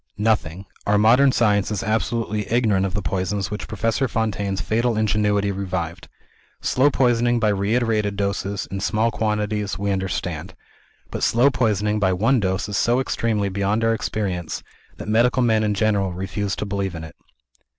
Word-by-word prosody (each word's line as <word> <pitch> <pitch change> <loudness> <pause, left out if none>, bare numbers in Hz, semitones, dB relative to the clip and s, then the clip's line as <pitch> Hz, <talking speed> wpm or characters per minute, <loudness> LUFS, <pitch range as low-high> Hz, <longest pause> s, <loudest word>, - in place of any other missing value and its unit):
"Nothing. 100 -4 0 0.2
Our 105 0 +4
modern 125 +6 +5
science 105 -5 +2
is 105 -3 -2
absolutely 110 0 -1
ignorant 105 -5 +2
of 95 - -7
the 105 - -2
poisons 95 +2 -2
which 105 - -5
Professor 115 +4 0
Fontaine's 105 -4 -2
fatal 115 +1 0
ingenuity 105 -2 +1
revived. 90 -4 -4 0.5
Slow 135 +3 +3
poisoning 120 -2 +2
by 110 -1 +2
reiterated 105 0 0
doses, 100 0 -2
in 95 - -3
small 110 +4 +1
quantities, 105 -3 -1
we 100 +1 -1
understand. 95 -1 -3 0.6
But - - -4
slow 125 +5 +4
poisoning 105 -4 +1
by 95 -2 +2
one 115 +8 +2
dose 95 -1 -1
is 105 - -2
so 120 +1 +2
entirely 110 -5 0
beyond 100 +3 0
our 115 0 +3
experience, 100 -7 -3 0.3
that - - -8
medical 120 +4 +3
men 110 -2 +3
in 105 -1 0
general 100 -3 +1
refuse 95 +2 -3
to - - -4
believe 100 -2 -3
in 80 - -6
it." 80 - -10
105 Hz, 160 wpm, -22 LUFS, 100-115 Hz, 0.6 s, modern